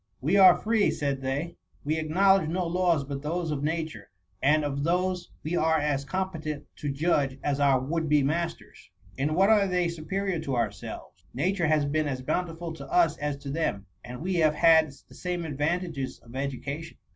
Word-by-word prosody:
We 155 +9 +1
are 190 -3 +8
free,^ 220 -1 +2
said 140 -2 -2
they; 135 +1 -1
^^ 170 - -10 0.3
we 155 +2 0
acknowledge 185 +2 +3
no 180 +2 -1
laws 170 -3 +1
but 140 0 -5
those 165 +2 -2
of 145 -2 -2
nature/ 155 -8 -3 0.3
and 150 +2 +3
of 140 -1 -2
those 180 +2 0
we 160 +3 -2
are 160 -1 +3
as 145 -2 -1
competent 155 -3 -3
to 145 - -3
judge 140 -2 +1
as 145 -1 0
our 140 -2 +4
would 155 +4 -2
be 150 -1 +4
masters. 165 +5 -3 0.3
In 145 +3 -1
what 195 +4 +5
are 205 -2 +4
they 180 -2 +1
superior 185 +3 -2
to 140 -4 -2
ourselves? 115 -4 -4
Nature 175 +5 +1
has 150 -1 +3
been 155 +1 0
as 130 -2 -3
bountiful 165 +2 -2
to 160 - -10
us 350 -1 +4
as 145 -1 -2
to 140 - -4
them, 140 -10 -1 0.2
and 125 +3 -8
we 185 +1 -1
have 155 -2 +3
had 160 0 +6 0.2
the - - -17
same 180 -2 -3
advantages 150 -1 -2
of 120 +2 -15
education. 140 +4 -4
155 Hz, 190 wpm, -27 LUFS, 140-175 Hz, 0.3 s, are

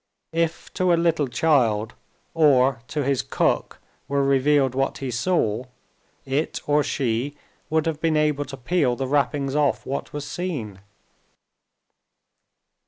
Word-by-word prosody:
If 165 0 -2
to 185 -1 +1
a - - +6
little 165 -4 +1
child 120 -6 +2 0.4
or 135 -6 +4
to 150 -2 -2
his 135 -1 +1
cook - - -1 0.3
were 140 0 +1
revealed 135 -1 +3
what 135 +1 -1
he 135 -2 -4
saw, 120 - 0 0.6
it 140 +4 -1
or 150 0 +3
she 130 +1 -1 0.3
would 160 0 +1
have 160 -2 -2
been 160 -2 +2
able 150 -1 +1
to 135 -1 -8
peel 135 -1 +1
the 135 - -3
wrappings 140 0 0
off 150 -2 +1
what 140 - -4
was 145 -1 -5
seen. 135 - -4
140 Hz, 135 wpm, -23 LUFS, 130-155 Hz, 0.6 s, a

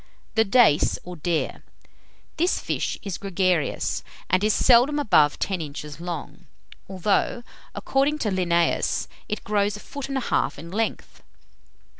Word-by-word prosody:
THE 225 - +4
DACE, 210 - +4
OR 180 0 -8
DARE. 165 0 -2 0.8
This 350 +3 +2
fish - - -2
is 195 -4 -4
gregarious, 185 -5 0 0.3
and 185 +2 +3
is 215 - +4
seldom 255 +6 +5
above 155 - +4
ten 190 -3 -2
inches 150 0 -7
long; 170 -4 -6 0.4
although, 195 +5 0 0.3
according 280 +3 +1
to 210 - +1
Linnaeus, 170 -2 +1 0.2
it 210 - -3
grows 205 0 0
a - - -10
foot 280 +4 -7
and 275 - -1
a - - -1
half - - 0
in 165 +4 -9
length. 220 +3 -3
195 Hz, 140 wpm, -24 LUFS, 170-235 Hz, 0.8 s, seldom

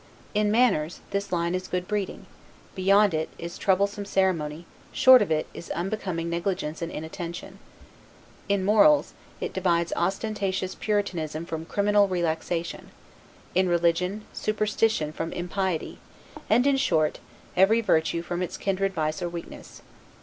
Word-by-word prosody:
In 210 0 +2
manners, 205 -9 +2
this 200 0 -2
line 170 -1 0
is 185 0 -3
good 180 0 -3
breeding; 205 -2 -3 0.5
beyond 195 +1 +4
it, 155 0 -1
is 170 +1 -7
troublesome 200 +1 +1
ceremony; 170 -5 0 0.3
short 260 -1 +7
of 205 - 0
it, 155 -1 +1
is 170 - -9
unbecoming 180 -2 -3
negligence 170 -2 -2
and 170 - -3
inattention. 170 +2 -7 0.9
In 200 -2 +1
morals, 285 +9 +5 0.3
it - - -4
divides 170 -2 +1
ostentatious 195 0 -1
puritanism 170 -7 -2
from 160 -1 -5
criminal 205 +1 +3
relaxation; 170 -1 -2 0.6
in 185 0 +2
religion, 175 +4 +1
superstition 215 -6 0
from 165 +1 -4
impiety: 180 -1 -2 0.5
and, 245 +4 +4
in 280 -1 +4
short, 160 - +1 0.4
every 195 +5 +5
virtue 170 -5 +1
from 175 +1 -3
its 180 - -3
kindred 195 0 -1
vice 155 -1 -1
or 175 - -2
weakness. 170 -1 -9
185 Hz, 135 wpm, -26 LUFS, 170-200 Hz, 0.9 s, short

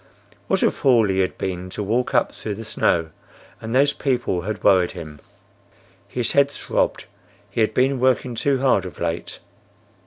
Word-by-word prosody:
What - - +1
a - - +4
fool 120 -6 +3
he 95 0 +1
had 95 - 0
been 90 -1 -4
to 100 +3 -4
walk 120 +5 -1
up - - +2
through 105 -2 -5
the 110 +2 -8
snow! 85 -6 +1 0.5
And 115 +2 -4
those 140 +2 +4
people 125 -9 -1
had 100 0 -5
worried 90 -2 +4
him! 80 -4 -9 0.9
His 120 +2 -2
head 140 0 +4
throbbed. - - -1 0.5
He - - -1
had 110 0 +1
been 130 +1 +2
working 130 -1 +1
too 135 +3 0
hard 135 -1 +2
of - - -11
late. - - -3
110 Hz, 175 wpm, -22 LUFS, 95-130 Hz, 0.9 s, a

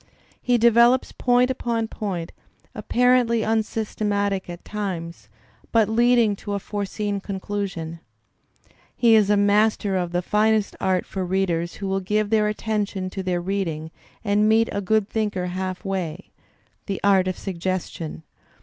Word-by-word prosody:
He 245 -1 +2
develops 235 +2 +4
point 250 +1 +2
upon 230 -3 -2
point, 185 -7 -4 0.4
apparently 245 -2 +2
im 220 0 +2
systematic 205 -3 -2
at 175 0 -8
times, 180 -5 -5 0.4
but 225 -3 +4
leading 235 -1 +3
to 205 - -5
a 200 - -1
foreseen 205 0 -3
conclusion. 190 -4 -4 1.0
He 235 -2 +4
is 215 -2 +5
a 210 - +4
master 205 0 +2
of 175 -2 -2
the 175 0 -1
finest 215 +1 +1
art 185 -1 +1
for 190 - -4
readers 180 -2 -1
who 200 - -5
will 195 0 0
give 210 +2 -1
their 215 -1 +3
attention 205 -3 -2
to 195 - -4
their 180 -2 -1
reading 170 -4 -3 0.3
and 210 0 +2
meet 225 +1 +3
a 200 - -2
good 215 +1 +1
thinker 210 -5 -2
halfway, 185 -1 -4 0.6
the 195 -2 -2
art^of 190 -2 +3
suggestion. 175 -3 -4
200 Hz, 140 wpm, -23 LUFS, 185-220 Hz, 1.0 s, is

